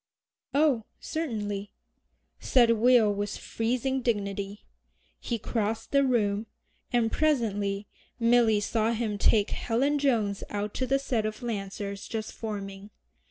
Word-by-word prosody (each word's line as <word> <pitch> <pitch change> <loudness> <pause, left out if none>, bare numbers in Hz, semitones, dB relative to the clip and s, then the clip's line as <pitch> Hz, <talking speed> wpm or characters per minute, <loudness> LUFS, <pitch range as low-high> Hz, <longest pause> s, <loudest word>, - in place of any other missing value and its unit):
"Oh, 280 -7 +3
certainly," 210 -10 -3 0.7
said 240 -3 +4
Will 230 -2 +5
with 205 0 -3
freezing 255 +3 -1
dignity. 200 -3 -2 0.5
He 235 - -2
crossed 220 0 -2
the 280 0 +4
room, 220 -4 +1 0.4
and 235 -3 +2
presently 205 -9 +1 0.3
Milly 230 -2 +4
saw 225 +2 +1
him 215 -3 -2
take 210 0 +3
Helen 275 +6 +1
Jones 225 -8 +1
out 205 0 -3
to 260 - -2
the 270 +2 +3
set 240 -5 -1
of 215 +3 -6
Lancers 200 -2 -4
just 220 -1 -4
forming. 200 -2 -6
225 Hz, 120 wpm, -28 LUFS, 205-245 Hz, 0.7 s, Will